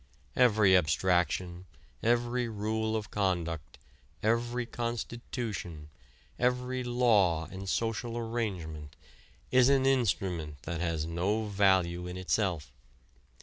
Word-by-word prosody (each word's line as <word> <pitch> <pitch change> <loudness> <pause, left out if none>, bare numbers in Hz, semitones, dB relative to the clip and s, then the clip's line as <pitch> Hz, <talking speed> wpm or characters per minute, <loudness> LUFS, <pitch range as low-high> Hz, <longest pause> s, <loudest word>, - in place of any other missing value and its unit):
Every 105 -6 +5
abstraction, 90 +1 +1 0.3
every 120 +1 +1
rule 110 +1 -1
of 110 -1 -4
conduct, 85 -6 -2 0.5
every 120 +2 +1
constitution, 115 - -5 0.5
every 125 +1 0
law 110 -10 +3
and 95 0 -6
social 115 +2 -1
arrangement, 95 -11 -4 0.6
is 130 0 +6
an 135 -1 +3
instrument 90 - 0
that 85 0 -4
has 85 -3 -1
no 95 +7 -1
value 95 -4 +2
in 90 0 -6
itself. 95 -4 -1
105 Hz, 100 wpm, -30 LUFS, 85-120 Hz, 0.6 s, is